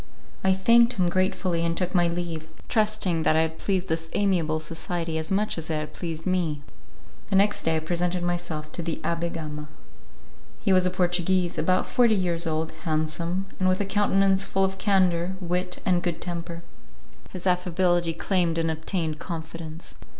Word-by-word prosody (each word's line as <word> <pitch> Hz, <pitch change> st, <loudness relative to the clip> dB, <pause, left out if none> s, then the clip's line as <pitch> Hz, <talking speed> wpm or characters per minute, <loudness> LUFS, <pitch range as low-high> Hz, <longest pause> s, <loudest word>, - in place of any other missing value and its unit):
I 190 Hz, -, +4 dB
thanked 235 Hz, +5 st, +5 dB
him 180 Hz, -3 st, +1 dB
gratefully 185 Hz, -1 st, 0 dB
and 170 Hz, 0 st, 0 dB
took 180 Hz, 0 st, -1 dB
my 175 Hz, -2 st, +4 dB
leave, 170 Hz, -2 st, -3 dB, 0.2 s
trusting 215 Hz, -7 st, +1 dB
that 155 Hz, -, +3 dB
I 160 Hz, -, +5 dB
had 160 Hz, 0 st, -2 dB
pleased 190 Hz, -2 st, 0 dB
this 165 Hz, 0 st, -2 dB
amiable 170 Hz, -6 st, +1 dB
society 165 Hz, +1 st, -3 dB
as 160 Hz, +2 st, -4 dB
much 205 Hz, -2 st, +1 dB
as 160 Hz, -, -6 dB
it 160 Hz, -, 0 dB
had 155 Hz, 0 st, -4 dB
pleased 165 Hz, -2 st, -5 dB
me. 170 Hz, -6 st, 0 dB, 0.7 s
The 195 Hz, -, +1 dB
next 205 Hz, +2 st, +4 dB
day 160 Hz, -, +1 dB
I -, -, +2 dB
presented 175 Hz, +2 st, -1 dB
myself 175 Hz, -3 st, -3 dB
to -, -, -4 dB
the 165 Hz, -1 st, -2 dB
Abbé 170 Hz, 0 st, -1 dB
Gama. 150 Hz, -2 st, -6 dB, 0.9 s
He 195 Hz, -, +2 dB
was 185 Hz, 0 st, +5 dB
a -, -, +2 dB
Portuguese, 180 Hz, 0 st, +1 dB
about 185 Hz, 0 st, +2 dB
forty 235 Hz, -3 st, +4 dB
years 175 Hz, -3 st, 0 dB
old, 160 Hz, 0 st, -1 dB
handsome, 165 Hz, +4 st, -1 dB
and 185 Hz, 0 st, +3 dB
with 185 Hz, -, +1 dB
a 205 Hz, -, 0 dB
countenance 195 Hz, -1 st, +3 dB
full 195 Hz, 0 st, +1 dB
of 190 Hz, 0 st, -4 dB
candour, 185 Hz, -3 st, +2 dB
wit, 180 Hz, 0 st, -1 dB
and 180 Hz, -2 st, +3 dB
good 175 Hz, -2 st, -2 dB
temper. 170 Hz, -1 st, -5 dB, 0.7 s
His 185 Hz, -1 st, -8 dB
affability 175 Hz, -2 st, +2 dB
claimed 175 Hz, -2 st, +1 dB
and 165 Hz, -1 st, +1 dB
obtained 160 Hz, -1 st, -2 dB
confidence. 165 Hz, -1 st, -7 dB
175 Hz, 175 wpm, -26 LUFS, 165-185 Hz, 0.9 s, thanked